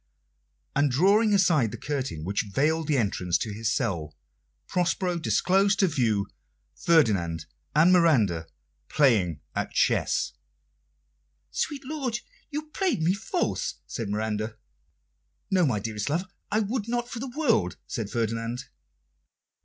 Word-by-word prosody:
And, 145 +1 +3
drawing 200 - +4
aside 170 - +4
the - - -7
curtain 135 - -3
which 100 +4 -1
veiled 155 +6 +1
the 150 - +2
entrance 90 -6 +1
to 110 - -4
his 110 +1 -1
cell, 85 - -2 0.5
Prospero 180 0 0
disclosed 195 +4 +2
to 195 - +4
view 115 - +1 0.5
Ferdinand 95 - +2 0.3
and 165 +4 +6
Miranda 110 - +3 0.4
playing 100 - +3
at - - -2
chess. - - +1 1.2
"Sweet 280 -2 -2
lord, 265 -5 -2 0.3
you 305 0 -5
play 375 -2 +1
me 165 +2 +2
false," 360 - -2
said 115 -5 -5
Miranda. 110 +1 -2 0.9
"No, 185 -4 +4
my 115 -6 0
dearest 105 +3 -3
love, 165 +6 0 0.3
I 215 +2 +2
would 215 +1 -2
not 240 0 -1
for 240 - -6
the 265 +2 -4
world," 260 -8 +2
said 110 -5 -4
Ferdinand. 115 +2 -2
145 Hz, 130 wpm, -27 LUFS, -, 1.2 s, and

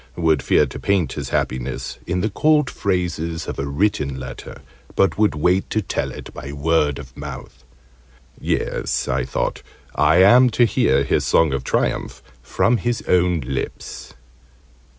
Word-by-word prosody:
would 80 -4 +2
fear - - +3
to - - -8
paint 100 -5 0
his - - -5
happiness 65 +1 -3
in 90 +1 -1
the 110 - 0
cold 150 +3 +2
phrases 90 -4 -2
of - - -5
a 70 - -2
written 70 -4 0
letter, 65 -1 -9 0.3
but 95 - +3
would 105 -5 +2
wait 90 +5 +1
to 110 - 0
tell 100 - -2
it - - -10
by 70 - -7
word 75 -1 +1
of 65 -3 -11
mouth. 70 -3 -9 0.8
"Yes," - - -1
I 60 0 0
thought, 65 - -2 0.3
"I 80 - +3
am 125 +6 +7
to 120 - +6
hear 70 - +2
his 70 - +1
song 80 -4 +3
of 70 - -2
triumph - - -1 0.2
from 115 - +1
his 120 0 -2
own 90 -2 +2
lips!" 65 +1 -6
80 Hz, 155 wpm, -21 LUFS, 70-100 Hz, 0.8 s, am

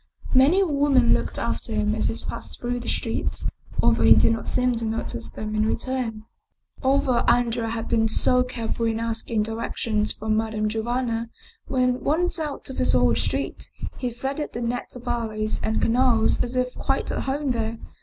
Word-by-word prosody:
Many 280 +9 +5
a - - +3
woman 280 -6 +4
looked - - -1
after 225 - -2
him 215 0 +1
as 220 - 0
he 225 - -2
passed - - -6
through 245 0 -2
the 240 - -5
streets, - - -2 0.4
although - - +3
he - - +8
did - - +4
not 225 - -4
seem 250 0 +2
to 230 - -1
notice 220 - -3
them 215 0 -5
in 215 0 +2
return. 235 -3 -2 0.6
Although 265 -2 +2
Andrea 235 -1 +2
had 225 0 -3
been 225 -1 +2
so 250 +3 +3
careful 235 -2 -2
in 225 0 0
asking 225 -1 -1
direc 225 +1 -4
tions 215 -2 0
from 215 0 -1
Madame 220 -1 0
Giovanna, 230 +1 -1 0.4
when 255 -2 +1
once 340 +4 +1
out 300 -3 -4
of - - -8
his - - +2
own - - +4
street - - -2 0.3
he 250 - -1
threaded 270 +5 -4
the 235 - -4
net 240 +1 -3
of 250 0 -10
alleys 220 -3 -2
and 220 - 0
canals 235 -1 +3
as 245 +1 -4
if 250 0 0
quite - - -1
at - - -2
home 275 0 0
there. 225 -1 -2
235 Hz, 185 wpm, -24 LUFS, 225-255 Hz, 0.6 s, he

